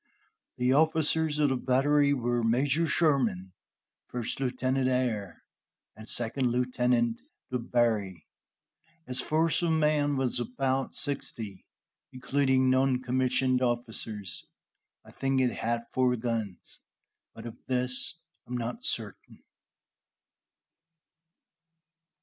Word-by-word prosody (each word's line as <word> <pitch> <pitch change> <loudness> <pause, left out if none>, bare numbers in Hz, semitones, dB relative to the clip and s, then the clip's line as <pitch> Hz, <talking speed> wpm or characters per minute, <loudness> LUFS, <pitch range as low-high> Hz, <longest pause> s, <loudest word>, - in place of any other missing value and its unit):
The 125 +1 +2
officers 160 0 +2
of 150 -1 +3
the 130 - +1
battery 140 +3 +2
were 120 -3 0
Major 135 +8 +2
Sherman, 125 - +1 0.5
First 120 0 -4
Lieutenant 130 0 0
Ayer, 115 -8 -2 0.5
and 110 0 -10
Second 120 +2 0
Lieutenant 125 -1 +1 0.3
Du 125 - -1
Barry. 110 -7 0 0.8
Its 125 0 -1
force 160 +4 +1
of 170 - +1
men 150 -2 +2
was 130 -2 0
about 130 +2 -2
sixty, 115 -8 -2 0.4
including 130 0 +1
noncommissioned 130 0 +2
officers. 115 -5 -3 0.6
I - - -14
think 135 0 0
it 125 -2 +2
had 115 +1 -2
four 125 -1 +2
guns, 115 -5 -4 0.6
but 115 - -10
of 115 -1 -8
this 125 +2 +1 0.3
I - - -22
am 125 - -1
not 120 0 -5
certain. - - -2
125 Hz, 105 wpm, -28 LUFS, 120-135 Hz, 0.8 s, of